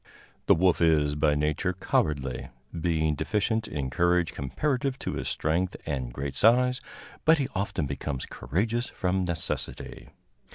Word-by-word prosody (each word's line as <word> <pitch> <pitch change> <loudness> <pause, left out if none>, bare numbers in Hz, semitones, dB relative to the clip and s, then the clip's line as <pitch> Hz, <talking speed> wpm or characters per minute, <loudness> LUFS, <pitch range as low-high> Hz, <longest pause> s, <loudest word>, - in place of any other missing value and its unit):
The - - +7
wolf 90 +1 +3
is 75 -3 +4
by 75 0 +2
nature 75 +5 0
cowardly, 70 -7 -1 0.2
being 80 -2 +1
deficient 110 - 0
in 70 -4 -3
courage 85 +2 +2
comparative 130 - -1
to - - -4
his - - -3
strength 85 +4 0
and 65 -6 -3
great 70 +1 -4
size, 125 - +4 0.4
but 160 +1 +6
he 135 -3 0
often 95 -5 -1
becomes 70 -1 -4
courageous 115 - -1
from 95 -1 -1
necessity. 85 -2 -4
85 Hz, 135 wpm, -27 LUFS, 75-105 Hz, 0.4 s, The